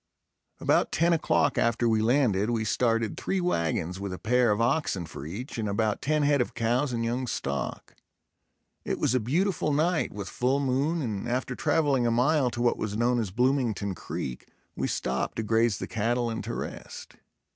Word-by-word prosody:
About - - +2
ten 170 +1 +3
o'clock 145 -3 +2
after 115 0 +2
we 110 -1 +2
landed, 110 -4 +2
we 115 -2 0
started 115 -2 +1
three 195 - -1
wagons 90 - -1
with 100 -1 -4
a 90 - -5
pair 125 +3 +2
of 105 +1 +1
oxen 115 - 0
for 75 -2 -8
each 115 - -6
and 105 -2 -1
about 105 +1 0
ten 150 +1 +1
head 145 -2 +3
of 120 - -3
cows 120 +4 +1
and 115 -1 -1
young 125 +2 -1
stock. 70 - -4 0.9
It - - -2
was - - +1
a 130 - +3
beautiful 155 - 0
night, 160 +4 +1
with 100 -2 -6
full 130 +7 0
moon 140 +4 0
and 105 -2 -3
after 125 +1 -1
traveling 140 -6 +2
a - - +3
mile 130 +3 +3
to 120 0 -3
what 120 - +2
was 105 -1 -2
known 120 +1 +2
as 110 -4 -2
Bloomington 120 -3 0
Creek, 65 -7 -6 0.3
we - - -1
stopped 65 0 -2
to 110 - -2
graze 110 -1 +2
the - - -4
cattle 120 +2 -1
and 110 - -4
to - - -4
rest. - - -7
120 Hz, 190 wpm, -27 LUFS, 105-135 Hz, 0.9 s, ten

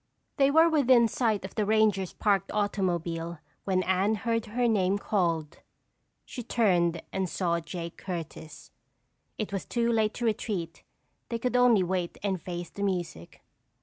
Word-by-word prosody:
They 275 -2 +5
were 320 +3 +6
within 260 -7 +5
sight 220 -4 0
of 190 - -8
the 215 - 0
ranger's 210 -3 +2
parked 200 -3 0
automobile 175 -5 -1 0.3
when 185 -1 +1
Anne 190 +4 +2
heard 230 +1 -1
her 240 +3 0
name 200 -3 +2
called. 170 -7 -1 0.7
She 245 - -7
turned 180 -8 +1
and 190 -1 -1
saw 170 -2 0
Jake 170 0 -7
Curtis. 165 -3 -7 0.7
It 215 -2 -4
was 195 - -2
too 235 -1 0
late 220 -2 +1
to 240 - -3
retreat. 210 -7 -2 0.5
They 235 - -1
could 250 +2 -2
only 245 -6 +5
wait 180 -1 -2
and 190 -4 -1
face 175 -1 -6
the 200 - -8
music. 175 - -3
200 Hz, 150 wpm, -28 LUFS, 175-230 Hz, 0.7 s, were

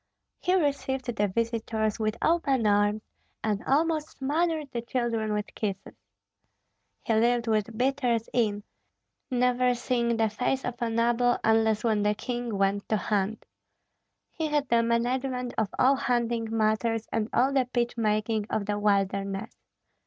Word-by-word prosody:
He 365 +1 +1
received 270 -6 -1
the 205 0 +1
visitors 225 +1 -1
with 215 0 -1
open 280 -8 +2
arms, 205 +1 +2 0.4
and 210 -1 -1
almost 310 +2 +1
smothered 305 +1 -1
the 235 - -3
children 235 -3 -1
with 210 0 -3
kisses. 195 -3 -4 1.1
He 225 - 0
lived 235 +2 +2
with 220 0 0
beaters 245 -3 +1
in, 210 -4 +1 0.7
never 250 0 +2
seeing 235 -1 0
the 225 -1 +3
face 250 +5 -1
of 245 -1 -5
a 235 - 0
noble 240 +2 +2
unless 220 -1 +3
when 220 -3 +2
the 210 0 +2
king 240 -1 -3
went 195 +1 0
to 215 - +2
hunt. 205 +1 -1 0.9
He 320 - -2
had 295 -1 0
the 235 0 +4
management 250 +2 -1
of 215 -3 0
all 270 +2 +5
hunting 240 -3 0
matters 225 0 0
and 225 0 -1
all 265 +3 +2
the 260 -3 +2
pitch 240 -1 0
making 215 -1 0
of 205 - -1
the 205 0 -1
wilderness. 200 +1 0
230 Hz, 145 wpm, -27 LUFS, 215-250 Hz, 1.1 s, all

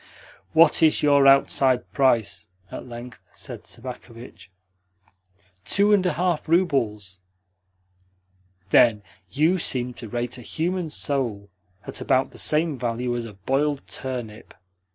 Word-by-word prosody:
"What 165 +2 +5
is 160 -1 +4
your 140 -2 +5
outside 135 -2 +3
price?" 125 -6 +1 0.2
at - - -8
length 120 +1 -10
said - - -9
Sobakevitch. 115 -4 -9 1.1
"Two 205 - +3
and 200 -3 +4
a - - 0
half 175 -3 -1
roubles." 115 - 0 1.5
"Then 110 -3 +5 0.3
you 160 - +2
seem 125 -5 -1
to 115 - -8
rate 120 +2 -4
a - - -10
human 170 +6 -3
soul 120 -10 -3 0.3
at - - -6
about 130 +1 +1
the - - -10
same 155 -3 +1
value 120 0 -2
as 120 -1 -3
a 110 - -10
boiled 135 +8 -1
turnip. 120 -5 -7
130 Hz, 125 wpm, -24 LUFS, 115-150 Hz, 1.5 s, What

